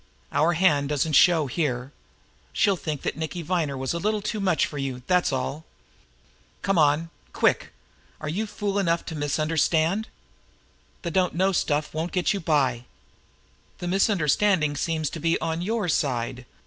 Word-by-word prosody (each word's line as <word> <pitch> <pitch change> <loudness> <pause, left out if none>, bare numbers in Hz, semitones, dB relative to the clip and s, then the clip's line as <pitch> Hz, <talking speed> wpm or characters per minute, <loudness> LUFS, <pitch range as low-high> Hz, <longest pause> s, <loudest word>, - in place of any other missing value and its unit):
Our 165 +3 +3
hand 150 -5 +3
doesn't 150 +1 0
show 165 0 +5
here. 130 -3 -2 0.6
She'll 200 -3 +3
think 155 -5 -5
that - - -2
Nicky 160 +2 -4
Viner 160 -5 -1
was 130 +2 -2
a 170 - -2
little 210 +2 -1
too 215 0 -2
much 185 -6 +2
for 145 - -6
you, 130 -2 -4
that's 180 -3 +2
all. 135 +4 -3 1.0
Come 195 -3 +2
on, 145 0 +4
now 165 - -10 0.2
quick! - - +1 0.5
Are 155 - -6
you 200 +9 -2
fool 205 -1 -2
enough 170 -3 +1
to 160 - -6
misunderstand? 160 - +1 1.0
The 170 - -3
'don't 180 0 +1
know' 190 +3 +2
stuff 150 -4 0
won't 160 +3 -3
get 180 +2 +1
you 200 - -2
by!" 135 -7 +1 0.9
"The 175 - -5
misunderstanding 180 -3 +2
seems 155 +1 -1
to 165 - -6
be 165 +2 +1
on 165 +1 -2
your 215 +1 -1
side." 125 -5 -1
160 Hz, 160 wpm, -25 LUFS, 145-185 Hz, 1.0 s, show